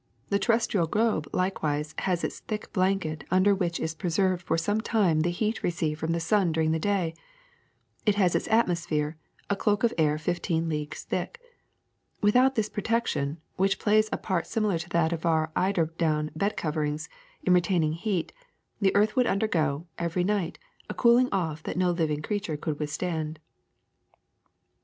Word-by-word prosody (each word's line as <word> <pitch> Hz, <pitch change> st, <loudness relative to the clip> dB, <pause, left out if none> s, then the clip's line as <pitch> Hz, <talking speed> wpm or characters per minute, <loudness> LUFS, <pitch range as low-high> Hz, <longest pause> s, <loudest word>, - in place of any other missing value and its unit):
The 200 Hz, -, +2 dB
terrestrial 210 Hz, -4 st, +2 dB
globe 210 Hz, -5 st, +1 dB
likewise 155 Hz, -5 st, -1 dB
has 180 Hz, -3 st, 0 dB
its -, -, -3 dB
thick 215 Hz, -1 st, -6 dB
blanket 185 Hz, -6 st, 0 dB
under 185 Hz, +3 st, +4 dB
which 175 Hz, -4 st, -1 dB
is 160 Hz, -, -2 dB
preserved 180 Hz, +2 st, 0 dB
for 165 Hz, -1 st, 0 dB
some 205 Hz, +6 st, 0 dB
time 200 Hz, -9 st, +2 dB
the 165 Hz, +3 st, +2 dB
heat 215 Hz, +6 st, -1 dB
re -, -, +1 dB
ceived 160 Hz, -3 st, -2 dB
from 160 Hz, +1 st, -1 dB
the 170 Hz, -, 0 dB
sun 180 Hz, +1 st, +2 dB
during 160 Hz, 0 st, +1 dB
the 160 Hz, -, +1 dB
day; 185 Hz, -3 st, 0 dB, 0.9 s
it 210 Hz, -2 st, +3 dB
has 185 Hz, -4 st, +3 dB
its -, -, 0 dB
atmos 180 Hz, -7 st, +2 dB
phere, 150 Hz, -1 st, -1 dB, 0.3 s
a 200 Hz, -, +1 dB
cloak 205 Hz, +2 st, +1 dB
of 235 Hz, -, +3 dB
air 150 Hz, -1 st, +3 dB
fifteen 165 Hz, 0 st, -1 dB
leagues 150 Hz, -2 st, -4 dB
thick. 475 Hz, -, -3 dB, 0.8 s
Without 250 Hz, +6 st, +4 dB
this 220 Hz, -2 st, +1 dB
protection, 210 Hz, -10 st, -1 dB, 0.2 s
which 195 Hz, +1 st, +2 dB
plays 215 Hz, 0 st, +3 dB
a -, -, 0 dB
part 185 Hz, -4 st, -2 dB
similar 210 Hz, -6 st, 0 dB
to 170 Hz, +2 st, -7 dB
that 170 Hz, -1 st, +2 dB
of 165 Hz, -, -4 dB
our 160 Hz, -1 st, +2 dB
eider 185 Hz, -3 st, +2 dB
down 155 Hz, -2 st, +1 dB
bed 200 Hz, +6 st, -1 dB
coverings 155 Hz, 0 st, -2 dB, 0.4 s
in 185 Hz, -, +4 dB
retaining 170 Hz, -3 st, +2 dB
heat, 180 Hz, 0 st, -2 dB, 0.5 s
the 195 Hz, -2 st, +2 dB
earth 210 Hz, +1 st, +3 dB
would 250 Hz, -2 st, +3 dB
undergo, 165 Hz, -8 st, 0 dB
every 170 Hz, +1 st, 0 dB
night, 195 Hz, -3 st, -1 dB, 0.3 s
a -, -, -4 dB
cooling 245 Hz, +1 st, +5 dB
off 160 Hz, -6 st, -1 dB
that 160 Hz, -, -5 dB
no 180 Hz, -1 st, +3 dB
living 155 Hz, -3 st, -1 dB
creature 205 Hz, -6 st, -2 dB
could 150 Hz, -1 st, -3 dB
withstand. 155 Hz, 0 st, -3 dB
175 Hz, 170 wpm, -27 LUFS, 160-205 Hz, 0.9 s, cooling